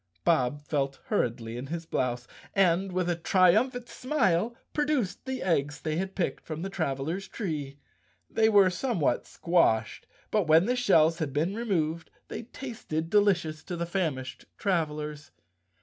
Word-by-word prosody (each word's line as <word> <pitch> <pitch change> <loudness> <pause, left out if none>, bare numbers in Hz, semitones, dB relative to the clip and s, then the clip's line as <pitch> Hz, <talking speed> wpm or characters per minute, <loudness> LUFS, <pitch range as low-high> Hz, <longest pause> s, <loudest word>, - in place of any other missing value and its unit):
Bob 145 -2 +1
felt 140 -2 -1
hurriedly 115 -1 -1
in 130 +3 -6
his 165 +2 -4
blouse 120 -5 -2 0.3
and, 190 0 +3
with 180 -1 0
a 175 - +1
tri¬ 180 +1 +4
umphant 245 +2 0
smile, 235 - 0 0.2
produced 285 -12 0
the 260 -1 -3
eggs 145 -5 0
they 155 -1 -2
had 190 +2 -3
picked 185 - -2
from 160 +1 -5
the 195 - -4
travelers' 160 +3 -2
tree. 150 - -4 0.5
They 220 0 +3
were 200 -3 +6
somewhat 180 - 0
squashed, 115 -11 +1 0.2
but 210 -6 +2
when 160 +3 +6
the 250 +3 +1
shells 165 -10 +4
had 150 -5 -2
been 160 +7 0
removed 170 -8 -1 0.2
they - - -5
tasted 220 - -5
delicious 175 -7 +2
to 180 - -4
the 170 - -1
famished 155 -8 -3
travelers. 150 -5 -2
170 Hz, 150 wpm, -28 LUFS, 150-200 Hz, 0.5 s, were